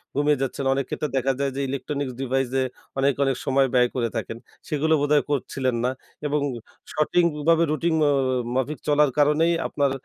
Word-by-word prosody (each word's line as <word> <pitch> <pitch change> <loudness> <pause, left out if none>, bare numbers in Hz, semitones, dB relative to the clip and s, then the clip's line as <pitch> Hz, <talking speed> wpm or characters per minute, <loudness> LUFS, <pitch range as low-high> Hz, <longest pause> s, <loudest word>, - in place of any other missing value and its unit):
ঘুমিয়ে 145 0 +2
যাচ্ছেন। 135 +1 -2
অনেক 135 -1 -1
ক্ষেত্রে 150 - -3
দেখা 135 +1 +1
যায় 140 -1 0
যে 140 - -2
ইলেকট্রনিক্স 140 -1 -3
ডিভাইসে 135 0 0 0.4
অনেক, 140 +1 +3
অনেক 135 -2 +1
সময় 135 -1 +3
ব্যয় 125 -1 +4
করে 120 -2 0
থাকেন। 115 - -4 0.3
সেগুলো 155 +2 +1
বোধহয় 145 0 +3
করছিলেন 130 -2 -1
না 130 - +1 0.4
এবং 150 0 0 0.5
সঠিকভাবে 165 0 +2
রুটিন 165 +1 0
অ - - +4
অ - - +3 0.4
মাফিক 135 +3 -1
চলার 150 -1 +4
কারণেই 150 +3 +3
আপনার 140 -2 0
140 Hz, 165 wpm, -24 LUFS, 135-150 Hz, 0.5 s, ব্যয়